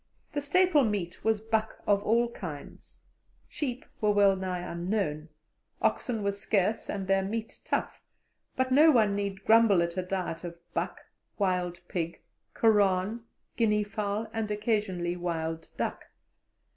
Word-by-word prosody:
The 290 - -1
staple 325 0 +4
meat 205 -6 -2
was 220 -1 +2
buck 220 0 -1
of 200 -1 +3
all 230 +3 +2
kinds; 155 -10 -9 0.4
sheep 255 -4 -4 0.2
were 210 - +3
wellnigh 190 -3 +3
unknown, 170 -3 -2 0.5
oxen 225 -4 0
were 200 - +2
scarce 200 +1 0
and 195 -2 -3
their 195 0 +3
meat 220 +3 -4
tough; - - -2 0.5
but 260 0 0
no 300 +5 +7
one 220 -8 +4
need 200 -1 -3
grumble 220 -5 +6
at 170 +1 -4
a - - +2
diet 180 -3 -3
of 170 -1 -6 0.2
buck, - - -2 0.4
wild 180 -3 0
pig, 170 -2 -3 0.4
koran, 210 0 +2 0.3
guinea 210 -2 +3
fowl, 205 +1 -2
and 225 -1 -2
occasionally 205 -5 -1
wild 165 -2 -3
duck. - - -3
205 Hz, 135 wpm, -29 LUFS, 180-225 Hz, 0.5 s, no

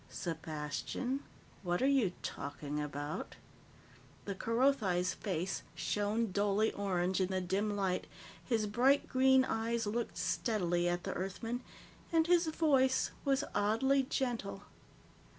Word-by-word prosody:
"Sepastian, 160 - -3 0.4
what 175 -2 0
are 265 - +3
you 185 -5 0
talking 145 +1 -4
about?" 145 +1 -4 0.9
The 200 - -2
Kerothi's 220 -5 +1
face 185 -2 -2
shone 210 +1 0
dully 205 +2 +2
orange 190 -1 0
in 185 - +2
the 190 0 -1
dim 200 +3 0
light, 190 -2 -1 0.4
his 225 -4 +1
bright 255 +7 +3
green 265 0 +5
eyes 230 0 -1
looked 225 +3 -2
steadily 175 0 0
at 175 0 -1
the - - -3
Earthman, 225 +6 -3 0.5
and 325 -1 +4
his 345 0 +4
voice 275 -5 +3
was 275 0 +2
oddly 230 +7 +3
gentle. 240 -7 -2
205 Hz, 120 wpm, -34 LUFS, 180-255 Hz, 0.9 s, green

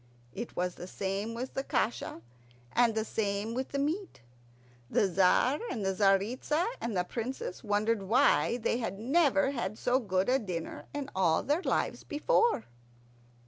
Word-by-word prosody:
It 235 +4 -6
was 180 0 -1
the 180 - -9
same 200 +4 -3
with 255 +3 -5
the 270 - -2
kasha 225 - -1 0.5
and 235 -2 +3
the 220 0 0
same 205 0 -2
with 260 +2 -3
the 280 - -3
meat. 315 - -2 0.7
The 200 - +3
Tzar 190 - +3
and 215 -5 -3
the 195 - +1
Tzaritza 210 - +2 0.2
and 230 -4 -2
the 180 - +2
Princess 235 0 -5
wondered 210 +1 +1
why 240 +3 +3
they 235 0 0
had 210 -5 -3
never 270 - +3
had 235 -5 -3
so 250 +2 +2
good 190 -5 0
a 260 +2 +3
dinner 180 -8 -5
in 285 -1 -5
all 170 -4 +3
their 295 +6 +1
lives - - -1
before. 450 - +2
225 Hz, 160 wpm, -30 LUFS, 195-265 Hz, 0.7 s, and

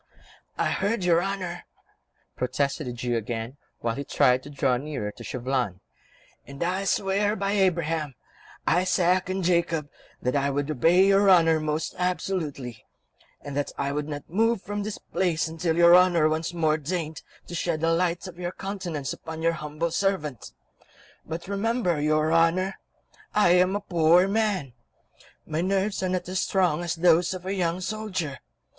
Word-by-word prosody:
"I - - +1
heard 205 +1 0
your 170 -1 +4
Honour," 185 -2 -4 0.7
protested 140 +3 -1
the - - -3
Jew 120 0 -2
again, 115 +3 -4 0.2
while 115 -1 0
he 140 - -4
tried 125 -2 +3
to 145 - -11
draw 135 -3 +1
nearer 135 -6 -4
to - - -12
Chauvelin, 125 -7 -2 0.7
"and 140 +3 -5
I 185 +3 -1
swear 200 +2 +1
by 195 -1 -1
Abraham, 165 -7 0 0.5
Isaac 180 +1 +2
and 190 0 -2
Jacob 170 -4 +1 0.3
that 125 +3 -1
I 140 0 +2
would 145 +2 -1
obey 165 +7 +4
your 195 0 +4
Honour 165 -3 +5
most 155 0 -2
absolutely, 155 - -3 0.6
and 140 -1 -7
that 145 0 -1
I 140 - -1
would 145 +1 -2
not 145 -1 -6
move 225 +3 +1
from 205 0 -3
this 210 0 -4
place 170 -4 -1
until 160 +1 -1
your 170 0 +8
Honour 175 -3 +5
once 160 +2 -1
more 160 -3 +1
deigned 160 0 -4 0.2
to - - -10
shed 165 -2 -1
the 165 0 +2
light 175 +1 0
of 180 -2 -9
your 175 0 -3
countenance 180 -9 -4
upon 160 0 -8
your 165 0 +3
humble 155 +2 -3
servant; 155 - -1 0.8
but 165 +2 -5
remember, 200 -5 0
your 155 +1 +2
Honour, 175 +4 +2 0.6
I 210 -4 +5
am 180 +2 +4
a 205 - -2
poor 170 -1 +4
old 195 - -1
man; 200 - 0 0.7
my 155 +1 -2
nerves 195 +2 0
are 185 - 0
not 180 -1 -2
as 185 0 -1
strong 175 -4 +1
as 170 -1 -2
those 175 +2 +3
of 180 0 -9
a 190 - -2
young 180 -2 -1
soldier. 185 -8 -3
170 Hz, 165 wpm, -26 LUFS, 150-185 Hz, 0.8 s, your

